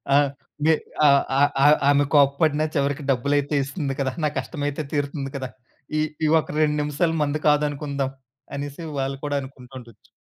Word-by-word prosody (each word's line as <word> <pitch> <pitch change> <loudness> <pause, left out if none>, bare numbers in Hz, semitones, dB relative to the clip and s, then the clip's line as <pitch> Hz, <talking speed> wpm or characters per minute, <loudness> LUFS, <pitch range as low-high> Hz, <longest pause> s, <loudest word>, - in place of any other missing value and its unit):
ఆ! - - +7 0.5
మి 160 - +6 0.4
ఆహ్, 140 0 +5 0.2
ఆహ్, 145 +1 +5
ఆహ్. 150 +1 +7
ఆమె 145 0 +4
కోప్పడిన 145 +2 +3
చివరికి 140 0 0
డబ్బులయితే 140 +3 0
ఇస్తుంది 140 0 -3
కదా! 135 -1 0
నా 150 - +3
కష్టమైతే 145 -1 -4
తీరుతుంది 140 -1 -2
కదా! 130 -2 -4 0.5
ఈ - - +2 0.2
ఈ - - +3
ఒక - - -5
2 150 -1 +2
నిమిషాలు 160 +3 0
మనది 150 +1 -1
కాదనుకుందాం. 145 -2 0 0.4
అనేసి 145 +3 -6 0.2
వాళ్ళు 135 0 -2
కూడా 145 -1 -1
అనుకుంటా 130 -1 -12
ఉండొచ్చు. 115 -3 -17
145 Hz, 160 wpm, -23 LUFS, 140-150 Hz, 0.5 s, ఆ